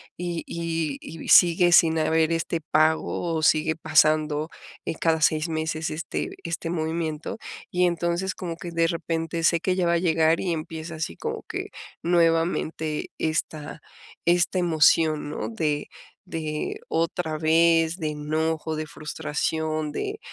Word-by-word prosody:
y 175 -1 -4
y 165 -3 -2
y 160 0 -9
sigue 175 0 +6
sin 160 -2 +6
haber 160 +1 +2
este 165 0 -1
pago, 160 +2 +1
o 155 - -1
sigue 160 0 +3
pasando, 155 -1 +2 0.4
eh, - - -2
cada 160 0 +1
6 155 +2 +2
meses, 160 0 -2
este 155 +2 -3 0.2
este 165 0 -3
movimiento, 160 0 -3 0.3
y 180 0 +1
entonces 175 +2 0
como 170 -2 -5
que 170 +1 -8
de 165 0 +2
repente, 165 0 -2
sé 170 0 +4
que 185 +2 0
ya 185 -1 +1
va 170 - +2
a - - +3
llegar, 165 -1 +3
y 175 -3 -1
empieza 160 +1 -6
así, 155 - -4
como - - -4
que - - -4 0.3
nuevamente, 165 -2 +1
esta 155 -1 -3 0.4
esta 175 +2 +2
emoción, 155 -2 +3
¿no?, 150 - -4
de 150 -9 -2 0.3
de 155 -2 -4
otra 165 -1 -1
vez, 165 +1 +3
de 155 -4 -2
enojo, 155 +1 -2
de 155 - -3
frustración, 155 0 -2
de 415 - -4
160 Hz, 145 wpm, -25 LUFS, 155-170 Hz, 0.4 s, sigue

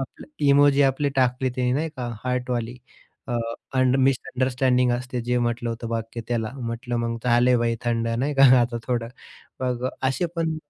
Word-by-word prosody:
आपला 135 - -7 0.2
इमोजी 140 0 +5
आपली 135 +1 +2
टाकली 130 0 +2
त्याने 125 -1 0
नाही 155 +5 0
का 125 -2 -4 0.2
हार्टवाली. 125 -1 -2 0.5
अ, 120 - -2 0.4
अंड 130 0 +3
मिसअंडरस्टँडिंग 130 -1 +1
असते 125 0 -3
जे 125 +1 0
म्हटलं 120 0 -1
होतं 115 0 -5
वाक्य 115 0 -4
त्याला, 115 -2 -1
म्हटलं 120 0 -4
मग 115 0 -1
झाले 125 +1 +4
भाई 115 0 0
थंड 115 -1 0
नाही 130 +6 -1
का 135 - +4 0.2
आता 120 0 0
थोडं. 120 -2 -1 0.5
मग 125 -1 -1
असे 135 +7 0
पण 160 -1 -1
125 Hz, 165 wpm, -24 LUFS, 120-130 Hz, 0.5 s, इमोजी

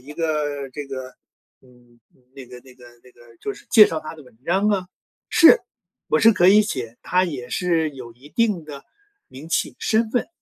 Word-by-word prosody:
一 140 +4 -12
个 150 -4 -3
这 145 +2 -7
个 130 -1 -8 0.5
嗯， 120 -2 -24 0.4
那 135 -1 -10
个 125 0 -12
那 130 -1 -18
个 125 - -18 0.2
那 125 - -19
个， 120 -1 -20
就 205 - -5
是 - - -18
介 215 -2 +8
绍 160 - -3
他 155 - -9
的 155 - -14
文 125 -4 -20
章 195 +5 +1
啊， 190 -3 0 0.4
是， 360 +8 +7 0.5
我 - - +2
是 225 0 +6
可 175 -2 +3
以 210 +2 +7
写， 120 - -6
他 185 +1 +1
也 130 -8 -6
是 170 -3 0
有 125 -4 -11
一 130 +5 -18
定 210 -3 0
的 140 -2 -10 0.4
名 140 +5 -12
气 - - -1
身 220 0 0
份， 245 - -1
150 Hz, 215 characters per minute, -21 LUFS, 130-185 Hz, 0.5 s, 介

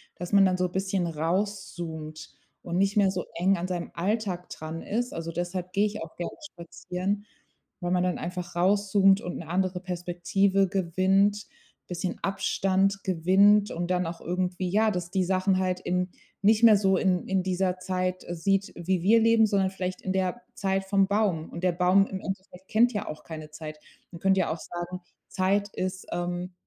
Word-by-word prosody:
dass 175 +2 -7
man 200 -1 +6
dann 185 -1 +2
so 180 0 0
bisschen 190 -1 -1
rauszoomt 165 -2 -3 0.3
und 170 0 -3
nicht 195 +2 +2
mehr 195 -2 +5
so 185 -1 -3
eng 185 +3 +2
an 175 +1 -3
seinem 175 -2 -4
Alltag 190 -1 -2
dran 160 +1 -6
ist. 245 +3 -2
Also, 165 0 -4
deshalb 175 +1 -4
geh 205 +1 +3
ich 210 -4 -3
auch - - -11
gerne 175 - -4 0.2
spazieren, 180 +4 -4 0.5
weil 175 -2 -2
man 180 0 +2
dann 180 -1 -1
einfach 175 0 -5
rauszoomt 195 +2 +4
und 175 - -5
'ne 170 - -8
andere 180 +1 0
Perspektive 185 +2 +1
gewinnt, 195 +3 +1 0.4
bisschen 180 +1 -3
Abstand 195 0 +1
gewinnt 195 +4 +4
und 175 +1 -3
dann 180 0 +1
auch 165 +1 -6
irgendwie 180 +1 -2
ja, 215 +3 +3
dass 180 -3 -3
die 190 -1 +1
Sachen 185 +1 +2
halt 185 -1 0
in 180 0 -1 0.3
nicht 215 +2 +4
mehr 220 -3 +8
so 195 -1 +3
in 180 -2 +1
in 190 -1 +1
dieser 185 0 0
Zeit 185 0 -2
sieht, 195 +3 0
wie 175 +1 -1
wir 215 +6 +5
leben, 225 0 +5
sondern 195 -2 +2
vielleicht 185 -1 -4
in 190 - -2
der 190 +4 -1
Zeit 195 -1 -1
vom 195 0 +3
Baum. 200 -6 0
Und 170 +2 -8
der 180 - +4
Baum 180 +3 +4
im 190 - -5
Endeffekt 190 -1 -7
kennt 240 +3 +4
ja 205 - -3
auch 155 0 -7
keine 155 -2 -8
Zeit. 155 -1 -8 0.3
Man 170 - -9
könnte 190 0 +3
ja 175 - +1
auch 160 - -4
sagen, 175 +2 -6 0.3
Zeit 200 +2 +1
ist, 185 0 -3
ähm 175 +1 -3
185 Hz, 185 wpm, -27 LUFS, 175-195 Hz, 0.5 s, mehr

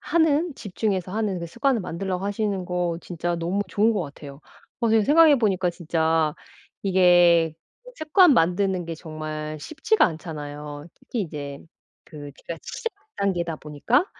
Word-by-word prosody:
하는 320 -1 +2
집중해서 195 -4 -3
하는 210 -4 -1
그 170 - -5
습관을 240 - 0
만들라고 185 +2 -3
하시는 205 -2 -1
거 175 -1 -1
진짜 175 0 -3
너무 180 +5 -1
좋은 220 +3 +2
것 205 - 0
같아요. 140 -1 -10 0.4
어 235 - +2
지금 220 -1 +4
생각해 300 -1 +6
보니까 190 -5 +1
진짜 160 -2 0 0.5
이게 175 -4 +5 0.4
습관 310 - +5
만드는 180 0 +2
게 165 0 -5
정말 155 -1 -6
쉽지가 315 - +1
않잖아요. 150 -2 -7
특히 235 - -5
이제 145 -4 -6 0.5
그 145 -2 -10 0.2
제가 170 - -5
시작 460 -2 -5 0.2
단계다 175 -5 -1
보니까 150 - 0
180 Hz, 310 characters per minute, -24 LUFS, 160-215 Hz, 0.5 s, 생각해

